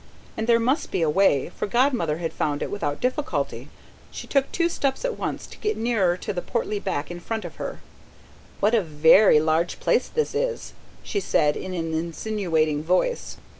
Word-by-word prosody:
And 220 +1 -3
there 230 -1 +5
must 260 +7 0
be 170 - 0
a 160 - +2
way, 160 -6 +3
for - - -4
Godmother 235 - +1
had 165 -1 -4
found 145 -1 -1
it - - -5
without 145 -8 -2
difficulty. 260 +4 -2 0.4
She - - -8
took 275 -1 +1
two 340 -1 +1
steps 280 - -1
at - - -1
once, - - -3
to - - -14
get 425 0 -1
nearer 205 -7 +1
to - - -4
the 175 - -3
portly 215 -2 -2
back 165 -6 -3
in 175 - -6
front 220 +2 -4
of 175 - -9
her. - - -6 0.8
"What 210 +3 +3
a 230 - +4
VERY 160 +2 +6
large 160 +2 0
place - - +2
this 460 -1 -1
is!" - - -2 0.3
she 405 - -2
said 150 - +2
in 185 -1 -5
an 165 -2 -3
insinuating 165 -3 -1
voice. 185 - 0
195 Hz, 190 wpm, -24 LUFS, 160-245 Hz, 0.8 s, VERY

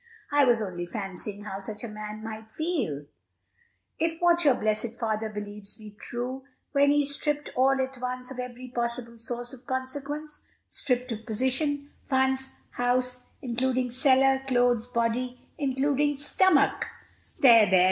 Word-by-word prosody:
"I 290 -1 +5
was 235 -3 +3
only 175 -3 -4
fancying 200 +1 -5
how 195 -2 -5
such 210 +2 -6
a - - -3
man 215 0 -7
must 220 0 -8
feel, 265 - -1 0.9
if 325 0 0
what 345 0 +4
your 280 -4 +5
blessed 220 +2 -1
father 220 -2 -1
believes 205 -1 -6
be 215 -1 -10
true, 245 +5 -5 0.3
when 285 0 +4
he 290 0 +4
is 285 0 +4
stripped 295 0 -1
all 270 +1 +4
at 265 -1 -2
once 250 0 -3
of 260 - -7
every 250 0 -6
possible 235 -1 -3
source 240 +2 -2
of 250 -1 -12
consequence, 285 +4 -4 0.3
stripped 250 -1 -1
of 225 0 -4
position, 280 +5 0 0.2
funds, 265 0 +2 0.2
house, 250 0 0 0.2
including 250 0 0
cellar, 265 +1 +4
clothes, 245 -2 +3
body, 245 +1 -1 0.2
including 285 +1 +1
stomach" 295 +1 +3 0.5
"There, 230 -5 +8
there! 185 0 +6
250 Hz, 145 wpm, -27 LUFS, 225-270 Hz, 0.9 s, There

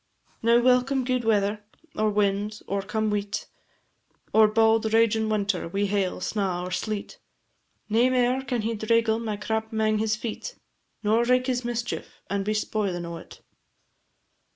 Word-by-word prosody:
Now 235 +1 +5
welcome 255 +2 +3
gude 255 -1 0
weather, 210 -1 +1 0.3
or 215 0 +1
wind, 205 +1 0
or 200 0 -1
come 215 +2 -1
weet, 205 0 -2 0.9
Or 220 0 +7
bauld 220 0 +3
ragin' 225 -1 +3
winter, 200 -4 0
wi' 200 +4 -1
hail, 195 -2 -1
snaw, 185 -3 -1
or 180 - -5
sleet, 210 +2 -4 0.7
Nae 230 +4 +3
mair 255 0 +2
can 245 -4 -2
he 230 +1 -1
draigle 225 +1 +1
my 220 -3 -3
crap 220 +2 -2
'mang 215 -1 +1
his 215 0 +1
feet, 230 - -6 0.5
Nor 220 +3 +3
wraik 250 +1 +3
his 250 -1 -1
mischief, 240 0 -4
and 200 0 0
be 215 +2 -1
spoilin' 200 -5 -1
o't. 170 0 -9
220 Hz, 150 wpm, -26 LUFS, 205-230 Hz, 0.9 s, Or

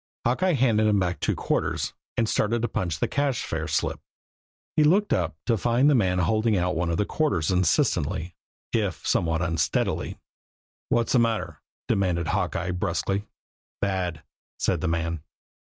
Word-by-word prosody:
Hawkeye 180 +10 +2
handed 115 -6 +3
him 105 -1 +3
back 90 -1 -1
two - - 0
quarters, - - -1 0.2
and 115 - +2
started 115 +2 +1
to - - +2
punch 85 -8 -2
a - - +2
cash 140 -3 0
fare 80 0 -3
slip. 80 -1 -1 0.8
He 155 - +5
looked 195 +7 +3
up 85 -4 0
to 115 -4 +1
find 120 +6 +3
the 150 - +5
man 95 -8 +2
holding 110 +4 +2
out 90 0 0
one 85 +1 0
of 85 - 0
the 105 - +1
quarters 95 - 0
insistently, 90 -1 +1 0.4
if 105 -7 -1
somewhat 80 0 +1
unsteadily. 80 -2 0 0.7
"What's 115 -1 +1
the 125 - +5
matter?" 115 -1 -1 0.3
demanded 85 -4 +1
Hawkeye 90 -1 -1
brusquely. 90 +3 -1 0.5
"Bad," 90 -5 -2 0.3
said - - 0
the - - 0
man. 85 -1 -1
95 Hz, 155 wpm, -26 LUFS, 85-115 Hz, 0.8 s, He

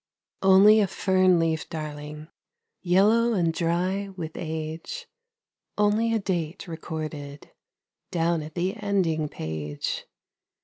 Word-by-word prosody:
Only 195 +3 +7
a 205 - +3
fern 185 -1 +3
leaf, 165 -2 0
darling, 150 0 -6 0.5
Yellow 215 +6 +4
and 170 -5 +1
dry 180 +4 0
with 175 -4 -6
age, 160 - -5 0.7
Only 210 +2 +2
a 225 - +2
date 180 -3 -3
recorded 155 -3 -6 0.6
Down 170 -1 +1
at 155 0 -9
the 185 +4 -1
ending 180 -7 0
page. 75 - -4
170 Hz, 105 wpm, -26 LUFS, 155-195 Hz, 0.7 s, Only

